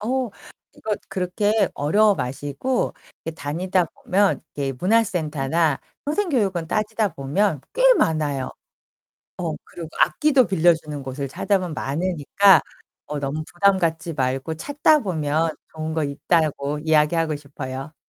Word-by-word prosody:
어, 250 Hz, +1 st, -1 dB, 0.4 s
이거 215 Hz, -, -3 dB
그렇게 200 Hz, +2 st, +1 dB
어려워 205 Hz, +8 st, +3 dB
마시고 145 Hz, -, -2 dB, 0.3 s
이렇게 165 Hz, 0 st, -5 dB
다니다 175 Hz, +5 st, 0 dB
보면 195 Hz, +4 st, +1 dB
이렇게 140 Hz, -2 st, -2 dB
문화센터나 165 Hz, -7 st, +1 dB, 0.2 s
평생교육원 255 Hz, -, 0 dB
따지다 215 Hz, -3 st, 0 dB
보면 150 Hz, +4 st, 0 dB
꽤 -, -, 0 dB
많아요. 150 Hz, -, 0 dB, 0.9 s
어. 170 Hz, -4 st, -2 dB
그리고 170 Hz, -2 st, -9 dB
악기도 280 Hz, -6 st, +4 dB
빌려주는 160 Hz, -5 st, +1 dB
곳을 135 Hz, +1 st, -5 dB
찾아보면 185 Hz, +1 st, -1 dB
많으니까 175 Hz, +6 st, +3 dB, 0.5 s
어 150 Hz, 0 st, -4 dB
너무 145 Hz, +3 st, -3 dB
부담 195 Hz, +2 st, +3 dB
갖지 170 Hz, -1 st, -1 dB
말고 135 Hz, +3 st, -1 dB
찾다 290 Hz, -, +2 dB
보면 160 Hz, -, 0 dB, 0.2 s
좋은 155 Hz, 0 st, -4 dB
거 160 Hz, -2 st, 0 dB
있다고 145 Hz, 0 st, 0 dB
이야기하고 155 Hz, 0 st, +2 dB
싶어요. 140 Hz, 0 st, -7 dB
165 Hz, 300 characters per minute, -23 LUFS, 145-200 Hz, 0.9 s, 악기도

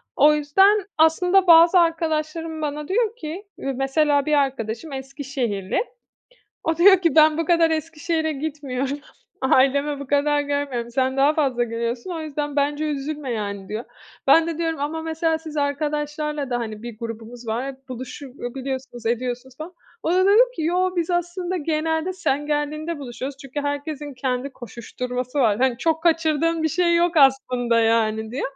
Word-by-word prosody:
O 300 Hz, +1 st, +6 dB
yüzden, 390 Hz, +8 st, +3 dB
aslında 360 Hz, +4 st, +4 dB
bazı 335 Hz, +2 st, +8 dB
arkadaşlarım 320 Hz, -1 st, -1 dB
bana 300 Hz, 0 st, -3 dB
diyor 450 Hz, +2 st, 0 dB
ki, 335 Hz, -1 st, -7 dB
mesela 275 Hz, +2 st, +1 dB
bir 305 Hz, -, 0 dB
arkadaşım 270 Hz, -1 st, -1 dB
Eskişehirli, 265 Hz, -7 st, -3 dB, 0.9 s
o 325 Hz, -1 st, 0 dB
diyor 385 Hz, +2 st, +7 dB
ki 335 Hz, -5 st, +2 dB
ben 310 Hz, 0 st, +6 dB
bu 330 Hz, -, +1 dB
kadar 335 Hz, 0 st, +3 dB
Eskişehir'e 320 Hz, 0 st, -1 dB
gitmiyorum, 280 Hz, -2 st, -3 dB, 0.4 s
ailemi 280 Hz, +2 st, +2 dB
bu 280 Hz, -, -6 dB
kadar 290 Hz, +1 st, +2 dB
görmüyorum, 285 Hz, -5 st, -2 dB
sen 260 Hz, +2 st, 0 dB
daha 280 Hz, +3 st, +4 dB
fazla 265 Hz, -6 st, +1 dB
geliyorsun 235 Hz, +6 st, -4 dB
o 330 Hz, -, -4 dB
yüzden 295 Hz, -1 st, -4 dB
bence 290 Hz, +1 st, 0 dB
üzülme 290 Hz, -2 st, -3 dB
yani 200 Hz, -3 st, -4 dB
diyor. 220 Hz, +3 st, -4 dB, 0.4 s
Ben 330 Hz, 0 st, +6 dB
de 330 Hz, -1 st, -4 dB
diyorum 325 Hz, -2 st, -2 dB
ama 315 Hz, +3 st, -3 dB
mesela 320 Hz, 0 st, 0 dB
siz 315 Hz, -1 st, -9 dB
arkadaşlarla 295 Hz, 0 st, -2 dB
da 245 Hz, -, 0 dB
hani 220 Hz, -2 st, -5 dB
bir 235 Hz, -2 st, -8 dB
grubumuz 230 Hz, +1 st, -8 dB
var, 250 Hz, +5 st, -3 dB
buluşup 255 Hz, +1 st, -8 dB, 0.2 s
biliyorsunuz, 260 Hz, -3 st, -5 dB
ediyorsunuz 245 Hz, +2 st, -3 dB
falan. 325 Hz, +4 st, -8 dB, 0.3 s
O 330 Hz, -, 0 dB
da 370 Hz, +1 st, +3 dB
dedi 410 Hz, +3 st, +6 dB, 0.2 s
ki -, -, -3 dB
"yok 365 Hz, +3 st, 0 dB
biz 340 Hz, 0 st, 0 dB
aslında 350 Hz, +1 st, -2 dB
genelde 320 Hz, +2 st, -1 dB
sen 290 Hz, -5 st, -1 dB
geldiğinde 305 Hz, +2 st, -2 dB
buluşuyoruz 265 Hz, +1 st, -6 dB
çünkü 275 Hz, +2 st, -5 dB
herkesin 285 Hz, 0 st, -4 dB
kendi 255 Hz, +1 st, -2 dB
koşuşturması 250 Hz, +2 st, -5 dB
var. 220 Hz, -6 st, +3 dB
Hani 255 Hz, -2 st, +1 dB
çok 320 Hz, -1 st, 0 dB
kaçırdığın 330 Hz, -1 st, +2 dB
bir 315 Hz, -, +2 dB
şey 340 Hz, +2 st, +2 dB
yok 340 Hz, 0 st, +1 dB
aslında" 255 Hz, -4 st, +3 dB
yani 220 Hz, -1 st, +1 dB
diye. 255 Hz, +4 st, -4 dB
290 Hz, 160 wpm, -22 LUFS, 255-320 Hz, 0.9 s, bazı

